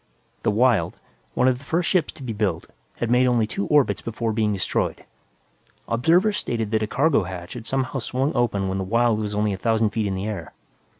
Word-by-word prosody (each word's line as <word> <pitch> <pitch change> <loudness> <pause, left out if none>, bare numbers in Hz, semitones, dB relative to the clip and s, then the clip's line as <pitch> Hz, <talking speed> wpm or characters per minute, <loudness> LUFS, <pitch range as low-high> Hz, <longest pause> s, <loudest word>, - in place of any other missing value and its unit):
The - - +1
Wyld, 120 +1 +2 0.4
one 125 - +3
of 125 -1 +2
the - - -15
first 165 +5 0
ships 180 -5 +2
to 135 - -11
be 120 -3 -3
built, 100 -6 -1 0.3
had 120 -1 -2
made 125 +1 +4
only 120 -3 +3
two 100 -2 -3
orbits 145 -3 +3
before 115 0 -2
being 110 -1 +1
destroyed. 100 -2 -1 0.8
Observers 175 - +3
stated 115 - -2
that 110 -1 +1
a 110 - 0
cargo 140 +3 +2
hatch 90 -1 -7
had 115 -2 -8
somehow 135 0 -1
swung 130 +5 -1
open 105 -6 0
when 95 +1 -2
the - - -1
Wyld 115 +2 +2
was 105 -1 -3
only 105 -1 +1
a 95 - -5
thousand 110 0 +1
feet 110 -1 -1
in 95 - -2
the 95 +2 -3
air. 105 -1 -5
115 Hz, 215 wpm, -23 LUFS, 105-130 Hz, 0.8 s, made